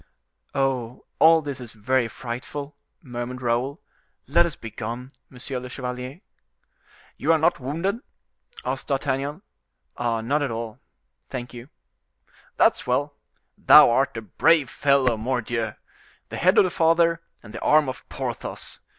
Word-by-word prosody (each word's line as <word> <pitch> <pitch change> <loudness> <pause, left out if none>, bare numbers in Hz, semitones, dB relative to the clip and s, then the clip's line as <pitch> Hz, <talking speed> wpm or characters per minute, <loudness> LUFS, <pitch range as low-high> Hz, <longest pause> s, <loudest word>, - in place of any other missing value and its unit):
"Oh! 130 -3 -1
all 160 0 +6
this 140 -2 -5
is 120 -2 -9
very 120 +3 +1
frightful!" 130 +5 -6 0.3
murmured 125 -1 -6
Raoul: 125 +5 0 0.5
"let 170 +4 +4
us 165 - -6
begone, 120 +3 -6 0.2
monsieur 130 0 -5
le 125 0 -8
chevalier." 125 +4 -6 1.0
"You - - +1
are 165 - +5
not 160 +3 +2
wounded?" 165 - -2 0.7
asked - - -3
D'Artagnan. 140 +1 -1 0.6
"Not 120 +4 0
at 145 - 0
all; 115 -1 -5 0.5
thank 125 -1 -6
you." 120 +3 -10 0.9
"That's - - +3
well! 140 +4 0 0.5
Thou - - +8
art 135 0 +1
a 115 - -5
brave 150 - +3
fellow, 135 -4 +3
mordioux! 115 -1 -2 0.5
The - - -5
head 185 +5 +3
of 205 - +8
the 185 - -1
father, 165 0 +3 0.2
and 105 -1 -12
the 115 - -6
arm 150 -1 +4
of 130 - -7
Porthos. - - -5
130 Hz, 135 wpm, -24 LUFS, 120-150 Hz, 1.0 s, Thou